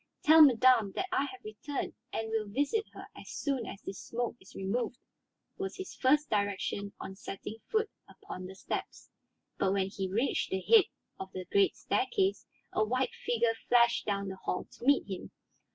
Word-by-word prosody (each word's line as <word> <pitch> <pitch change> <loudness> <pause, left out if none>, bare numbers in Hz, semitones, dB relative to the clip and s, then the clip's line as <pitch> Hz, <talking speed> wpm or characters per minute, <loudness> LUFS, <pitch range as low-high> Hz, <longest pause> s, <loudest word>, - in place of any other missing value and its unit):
"Tell 315 +1 +8
madame 250 -6 +6
that 375 - 0
I 370 -6 +2
have 385 +6 -9
returned 340 -9 -4 0.2
and 225 0 -3
will 220 -1 0
visit 285 - 0
her - - -9
as - - -11
soon 270 -5 -2
as 200 - -8
this 195 - -6
smoke 240 0 -3
is 190 - -17
removed," 225 +5 -2 0.6
was 390 0 -3
his 380 -1 -6
first 295 +3 +3
direction 200 -1 -1
on 190 - -7
setting 195 +2 -7
foot 440 0 +2 0.2
upon 185 - -8
the 190 - -10
steps. - - -5 0.5
But 190 0 +2
when 195 -1 +1
he 195 -1 -3
reached 225 +8 0
the 190 - -1
head 430 - +6 0.3
of 190 0 -6
the 185 -1 -5
great 395 - +3
staircase 390 -1 0 0.3
a 215 - +3
white 255 +4 0
figure 235 -1 +1 0.2
flashed 235 -1 +4
down 200 -1 -1
the 190 - -6
hall 185 - -2
to - - -14
meet 280 +1 +5
him. 190 -3 -6
235 Hz, 180 wpm, -31 LUFS, 200-295 Hz, 0.6 s, Tell